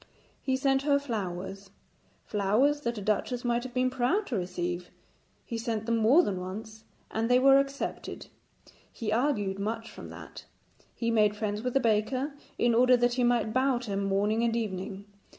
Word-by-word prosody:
He 265 Hz, -1 st, 0 dB
sent 270 Hz, 0 st, +2 dB
her 285 Hz, 0 st, +3 dB
flowers 195 Hz, -6 st, -5 dB, 0.6 s
flowers 225 Hz, +9 st, +2 dB
that 235 Hz, -3 st, -2 dB
a 205 Hz, -, -5 dB
duchess 240 Hz, +4 st, -1 dB
might 240 Hz, 0 st, +1 dB
have 250 Hz, 0 st, -8 dB
been 255 Hz, 0 st, +2 dB
proud 265 Hz, -, +1 dB
to 255 Hz, -, -3 dB
receive. 180 Hz, -1 st, -3 dB, 0.6 s
He 230 Hz, -, -4 dB
sent 225 Hz, -2 st, -2 dB
them 230 Hz, 0 st, +1 dB
more 245 Hz, +11 st, +5 dB
than 190 Hz, -3 st, -2 dB
once, 220 Hz, +4 st, -8 dB, 0.3 s
and 225 Hz, +1 st, -1 dB
they 250 Hz, -, +6 dB
were 270 Hz, +1 st, +6 dB
accepted; 275 Hz, 0 st, -4 dB, 0.7 s
he 220 Hz, -3 st, -4 dB
argued 215 Hz, -6 st, 0 dB
much 225 Hz, +3 st, -3 dB
from -, -, -10 dB
that. -, -, -10 dB, 0.5 s
He 230 Hz, -1 st, -1 dB
made 210 Hz, -2 st, +3 dB
friends 210 Hz, 0 st, -2 dB
with 250 Hz, +2 st, -3 dB
the -, -, +6 dB
baker 255 Hz, +5 st, 0 dB, 0.2 s
in 240 Hz, -1 st, +3 dB
order 250 Hz, +2 st, +5 dB
that 245 Hz, 0 st, +2 dB
he 250 Hz, 0 st, +1 dB
might 235 Hz, -3 st, +2 dB
bow 260 Hz, 0 st, +2 dB
to 240 Hz, -4 st, -6 dB
him 200 Hz, 0 st, -1 dB
morning 205 Hz, +3 st, +1 dB
and 230 Hz, -1 st, +1 dB
evening. 200 Hz, -2 st, -4 dB
230 Hz, 180 wpm, -29 LUFS, 210-255 Hz, 0.7 s, they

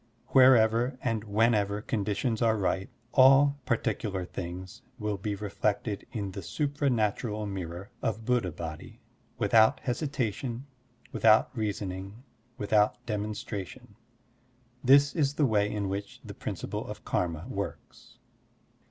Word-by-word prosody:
Wherever 125 Hz, -1 st, +5 dB
and 115 Hz, -3 st, -1 dB
whenever 105 Hz, -1 st, +2 dB
conditions 110 Hz, +2 st, -1 dB
are 110 Hz, -1 st, +3 dB
ripe, 95 Hz, 0 st, -1 dB, 0.2 s
all 140 Hz, +2 st, +6 dB
particular 105 Hz, -5 st, -1 dB
things 90 Hz, +1 st, -7 dB, 0.2 s
will 105 Hz, -3 st, -3 dB
be 105 Hz, +1 st, -2 dB
reflected 105 Hz, +1 st, -2 dB
in 105 Hz, -5 st, -4 dB
the 100 Hz, +1 st, -6 dB
supra 145 Hz, +2 st, -1 dB
natural 110 Hz, -2 st, -1 dB
mirror 95 Hz, +1 st, -6 dB
of 110 Hz, -2 st, -2 dB
Buddha 120 Hz, -7 st, +1 dB
Body, 80 Hz, -1 st, -8 dB, 0.4 s
without 110 Hz, -1 st, +4 dB
hesitation, 125 Hz, -2 st, -2 dB, 0.5 s
without 110 Hz, +3 st, +4 dB
reasoning, 100 Hz, 0 st, -4 dB, 0.3 s
without 105 Hz, -1 st, +1 dB
demonstration. 105 Hz, -, -5 dB, 0.9 s
This 140 Hz, +2 st, +5 dB
is 145 Hz, -3 st, +1 dB
the 150 Hz, -, +3 dB
way 105 Hz, -4 st, +2 dB
in 105 Hz, -2 st, -2 dB
which 100 Hz, +1 st, -5 dB
the -, -, -7 dB
principle -, -, -5 dB
of -, -, -8 dB
karma 85 Hz, -3 st, -1 dB
works. -, -, -7 dB
110 Hz, 115 wpm, -29 LUFS, 100-120 Hz, 0.9 s, all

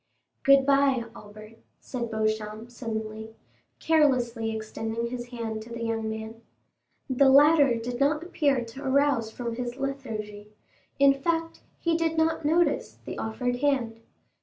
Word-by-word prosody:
"Good 275 Hz, -1 st, +5 dB
bye, 275 Hz, -3 st, +3 dB
Albert," 215 Hz, +1 st, -13 dB, 0.2 s
said 240 Hz, -3 st, -5 dB
Beauchamp 215 Hz, +1 st, -2 dB
suddenly, 220 Hz, -2 st, -6 dB, 0.4 s
carelessly 255 Hz, -8 st, +2 dB
extending 225 Hz, +1 st, -4 dB
his 245 Hz, -1 st, -5 dB
hand 230 Hz, -3 st, -5 dB
to 225 Hz, -, -11 dB
the 235 Hz, 0 st, -6 dB
young 225 Hz, -1 st, -2 dB
man. 220 Hz, +1 st, -7 dB, 0.7 s
The 270 Hz, 0 st, +4 dB
latter 285 Hz, -1 st, +6 dB
did 240 Hz, +2 st, -4 dB
not 295 Hz, +3 st, +2 dB
appear 285 Hz, -8 st, 0 dB
to 230 Hz, +5 st, -10 dB
arouse 270 Hz, -4 st, +2 dB
from 235 Hz, 0 st, -5 dB
his 245 Hz, -1 st, -4 dB
lethargy; 225 Hz, -7 st, -5 dB, 0.5 s
in 275 Hz, 0 st, +6 dB
fact, 330 Hz, +4 st, -2 dB, 0.2 s
he 335 Hz, -1 st, +1 dB
did 325 Hz, -1 st, 0 dB
not 320 Hz, 0 st, +1 dB
notice 335 Hz, +3 st, +1 dB
the -, -, -6 dB
offered 245 Hz, +3 st, -2 dB
hand. 250 Hz, -5 st, 0 dB
240 Hz, 135 wpm, -27 LUFS, 225-275 Hz, 0.7 s, latter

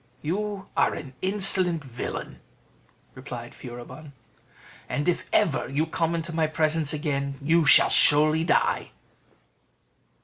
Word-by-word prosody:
"You 200 Hz, +4 st, -4 dB
are -, -, +1 dB
an 135 Hz, -3 st, -9 dB
insolent 185 Hz, -4 st, +3 dB
villain!" 125 Hz, -3 st, -7 dB, 0.7 s
replied 120 Hz, -3 st, -9 dB
Furibon, 125 Hz, +4 st, -11 dB, 0.8 s
"and 145 Hz, +2 st, -3 dB
if 175 Hz, -, -1 dB
ever 145 Hz, -, +1 dB
you 145 Hz, +4 st, -1 dB
come 165 Hz, +1 st, -2 dB
into 165 Hz, 0 st, -4 dB
my 160 Hz, -1 st, 0 dB
presence 155 Hz, -1 st, 0 dB
again, 140 Hz, -3 st, -3 dB
you 160 Hz, +3 st, +2 dB
shall -, -, +6 dB
surely 155 Hz, +1 st, +5 dB
die." 165 Hz, -, 0 dB
155 Hz, 115 wpm, -25 LUFS, 140-170 Hz, 0.8 s, shall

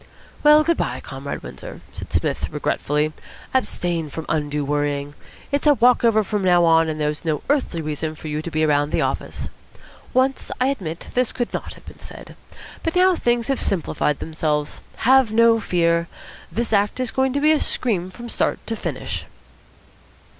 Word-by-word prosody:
"Well, 300 Hz, +1 st, +7 dB
good 335 Hz, +1 st, +1 dB
bye, -, -, -2 dB
Comrade 135 Hz, +1 st, -6 dB
Windsor," -, -, -9 dB
said -, -, -8 dB
Psmith -, -, -1 dB
regretfully. 150 Hz, +1 st, -1 dB, 0.4 s
"Abstain 175 Hz, -, -1 dB
from 160 Hz, +2 st, -6 dB
undue 150 Hz, -2 st, -1 dB
worrying. 145 Hz, 0 st, -1 dB, 0.4 s
It's 285 Hz, +1 st, +1 dB
a 295 Hz, -, +7 dB
walk 245 Hz, 0 st, +4 dB
over 220 Hz, -2 st, +4 dB
from 210 Hz, 0 st, -2 dB
now 175 Hz, -2 st, +5 dB
on, 165 Hz, -1 st, +4 dB
and 155 Hz, 0 st, -3 dB
there's 150 Hz, 0 st, -1 dB
no 155 Hz, -3 st, -1 dB
earthly 225 Hz, -, 0 dB
need 155 Hz, +1 st, -3 dB
for 155 Hz, -, -8 dB
you 150 Hz, 0 st, -2 dB
to 170 Hz, -, -5 dB
be 155 Hz, -1 st, 0 dB
around 145 Hz, -1 st, +2 dB
the -, -, 0 dB
office. -, -, -3 dB, 0.6 s
Once, 260 Hz, +1 st, +1 dB
I 255 Hz, +1 st, +3 dB
admit, 175 Hz, -, -4 dB
this 250 Hz, -1 st, +1 dB
could 240 Hz, -2 st, -3 dB
not -, -, -4 dB
have -, -, -17 dB
been -, -, -12 dB
said. -, -, -11 dB, 0.5 s
But 325 Hz, -, -2 dB
now 365 Hz, 0 st, +5 dB
things 240 Hz, -5 st, 0 dB
have 275 Hz, -1 st, 0 dB
simplified 155 Hz, -5 st, 0 dB
themselves. 150 Hz, -2 st, -2 dB, 0.2 s
Have 260 Hz, -2 st, +5 dB
no 230 Hz, 0 st, +5 dB
fear. 170 Hz, -4 st, +1 dB, 0.4 s
This 230 Hz, 0 st, -2 dB
act 205 Hz, +3 st, +2 dB
is 255 Hz, -3 st, -1 dB
going 265 Hz, 0 st, +1 dB
to 285 Hz, -, +1 dB
be 305 Hz, +2 st, +4 dB
a 310 Hz, -, +4 dB
scream 190 Hz, -7 st, -1 dB
from 240 Hz, +6 st, -9 dB
start -, -, 0 dB
to 225 Hz, -, -2 dB
finish." -, -, -4 dB
180 Hz, 180 wpm, -22 LUFS, 155-250 Hz, 0.6 s, Well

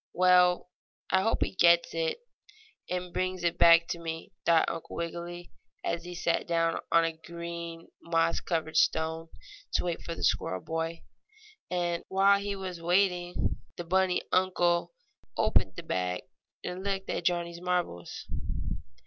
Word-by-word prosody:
"Well, 180 Hz, 0 st, +4 dB, 0.4 s
I 190 Hz, -, +4 dB
hope 225 Hz, +4 st, +2 dB
he -, -, -4 dB
gets 170 Hz, -2 st, +5 dB
it 165 Hz, -, -1 dB, 0.7 s
and 180 Hz, -1 st, -3 dB
brings 185 Hz, -1 st, -1 dB
it 170 Hz, -1 st, 0 dB
back 170 Hz, 0 st, +7 dB
to 170 Hz, -, -2 dB
me," 165 Hz, +2 st, -6 dB, 0.2 s
thought 165 Hz, -1 st, +5 dB
Uncle -, -, -5 dB
Wiggily, 170 Hz, +1 st, -5 dB, 0.3 s
as 170 Hz, 0 st, -2 dB
he 180 Hz, 0 st, -7 dB
sat 170 Hz, -1 st, 0 dB
down 165 Hz, -1 st, +1 dB
on 165 Hz, 0 st, +5 dB
a 165 Hz, -, 0 dB
green, 170 Hz, 0 st, -7 dB
moss 165 Hz, 0 st, +1 dB
covered 160 Hz, -2 st, -2 dB
stone 160 Hz, +1 st, +1 dB, 0.4 s
to -, -, +2 dB
wait 170 Hz, -2 st, -2 dB
for 170 Hz, -, -5 dB
the -, -, -6 dB
squirrel 95 Hz, 0 st, +1 dB
boy. 165 Hz, -, -3 dB, 0.7 s
And, 175 Hz, -1 st, -1 dB
while 195 Hz, +1 st, +4 dB
he 200 Hz, 0 st, -3 dB
was 185 Hz, -3 st, -6 dB
waiting 180 Hz, 0 st, +1 dB, 0.2 s
the 175 Hz, -, -4 dB
bunny 185 Hz, +1 st, +2 dB
uncle 175 Hz, -2 st, +2 dB, 0.5 s
opened -, -, +2 dB
the 170 Hz, -, -7 dB
bag 90 Hz, -, -1 dB, 0.4 s
and 180 Hz, +1 st, -5 dB
looked 195 Hz, -1 st, -2 dB
at 175 Hz, -, -3 dB
Johnnie's 170 Hz, 0 st, 0 dB
marbles. 180 Hz, -, -2 dB
170 Hz, 150 wpm, -29 LUFS, 165-180 Hz, 0.7 s, back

